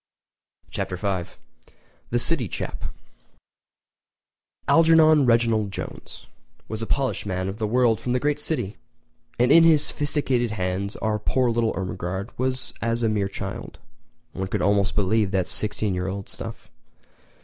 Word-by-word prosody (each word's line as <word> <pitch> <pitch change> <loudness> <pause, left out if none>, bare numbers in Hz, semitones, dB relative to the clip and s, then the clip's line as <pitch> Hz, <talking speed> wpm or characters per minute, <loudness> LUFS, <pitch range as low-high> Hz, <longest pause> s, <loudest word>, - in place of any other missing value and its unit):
Chapter 90 - -3
V: 95 -3 -2 0.8
The - - +1
City - - +3
Chap[edit] - - -4 1.8
Algernon 160 -3 +6
Reginald 115 -3 +2
Jones - - -8 0.4
was 110 0 -5
a 115 - -3
polished 130 -7 -1
man 95 -1 -2
of 100 +3 -5
the 110 - 0
world 120 0 +3
from 125 - -1
the 125 - +2
great 150 +2 0
city, 150 -10 -1 0.6
and 125 +2 +3
in 165 +2 +8
his 160 -3 +5
sophisticated 135 -6 0
hands 95 +1 -2
our 110 -1 -1
poor 125 +3 +1
little 115 -1 +1
Ermengarde 95 +1 -4
was 130 0 -2
as 115 +1 0
a 115 - +3
mere 105 -2 0
child. 100 - -6 0.6
One 95 - -3
could - - -2
almost 100 -1 +2
believe 105 0 +2
that 95 -2 0
sixteen 105 +1 -2
year 90 +1 -2
old 95 +1 -5
stuff. - - -9
110 Hz, 145 wpm, -24 LUFS, 100-125 Hz, 1.8 s, in